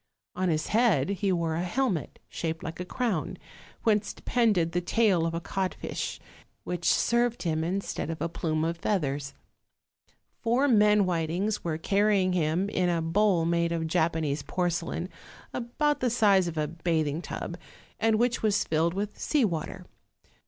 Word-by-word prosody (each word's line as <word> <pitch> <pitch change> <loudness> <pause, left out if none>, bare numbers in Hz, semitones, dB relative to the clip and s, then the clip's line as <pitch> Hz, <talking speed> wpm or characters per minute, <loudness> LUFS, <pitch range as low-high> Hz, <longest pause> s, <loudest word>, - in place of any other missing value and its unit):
On 185 0 0
his 155 -1 -1
head 210 - +3
he 200 0 0
wore 170 -3 0
a 165 - -1
helmet 190 - -1
shaped 160 -1 -4
like 165 -2 -6
a 180 - -3
crown, 220 -5 -2 0.5
whence 210 -2 +2
depended 210 -9 +1
the 175 - 0
tail 185 -3 +2
of 165 - -3
a - - -1
codfish, 190 +2 -3 0.4
which 175 -1 -1
served 240 0 +1
him 160 -2 0
instead 185 -2 -3
of 165 - -4
a 165 - -1
plume 160 -1 -1
of 165 +1 -2
feathers. 145 -8 -1 1.1
Four 245 +5 +2
men 210 -4 +5
whitings 180 +4 -1
were 160 -2 -1
carrying 195 +1 +2
him 170 +2 +1
in 180 -3 +1
a 170 -1 +1
bowl 170 +1 +2
made 170 0 +1
of 165 -1 -1
Japanese 160 -2 0
porcelain, 175 +2 -2 0.5
about 290 +5 0
the 255 - +1
size 200 -6 +4
of 165 -1 -5
a 150 -1 0
bathing 160 -1 -1
tub, 170 - -5 0.4
and 225 0 +3
which 240 +1 +1
was 210 -2 +2
filled 165 +2 0
with 205 +1 -4
sea 290 -6 +2
water. 165 -6 -4
175 Hz, 160 wpm, -28 LUFS, 165-210 Hz, 1.1 s, men